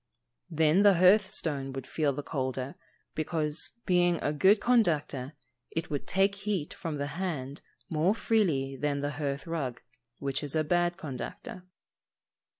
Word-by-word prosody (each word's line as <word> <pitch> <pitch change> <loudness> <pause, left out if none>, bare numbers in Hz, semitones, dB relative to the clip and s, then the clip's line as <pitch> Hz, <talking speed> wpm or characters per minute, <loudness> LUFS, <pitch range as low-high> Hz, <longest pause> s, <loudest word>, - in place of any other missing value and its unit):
_ - - -55 0.5
Then 160 +4 +4
the 205 -2 +6
hearth 190 +4 +5
stone 140 -4 -1
would 135 -1 -5
feel 150 0 0
the 145 +2 -5
colder, 130 -2 -3 0.4
because, 155 -1 0
being 175 -2 +3
a 145 - 0
good 195 +7 +5
conductor, 155 - +1 0.4
it 165 0 -4
would 145 - -3
take 195 +1 +3
heat 200 -6 -3
from 160 -2 -5
the 140 0 -2 0.2
hand 145 -7 -4 0.3
more 165 +6 +1
freely 160 -14 +1
than 140 +1 -1
the 145 0 -1
hearth 140 -2 -3
rug, 145 -7 -3 0.4
which 140 -1 -2
is 145 0 -2
a 155 - +2
bad 175 +2 +1
conductor. 185 - -7
155 Hz, 150 wpm, -29 LUFS, 140-180 Hz, 0.5 s, the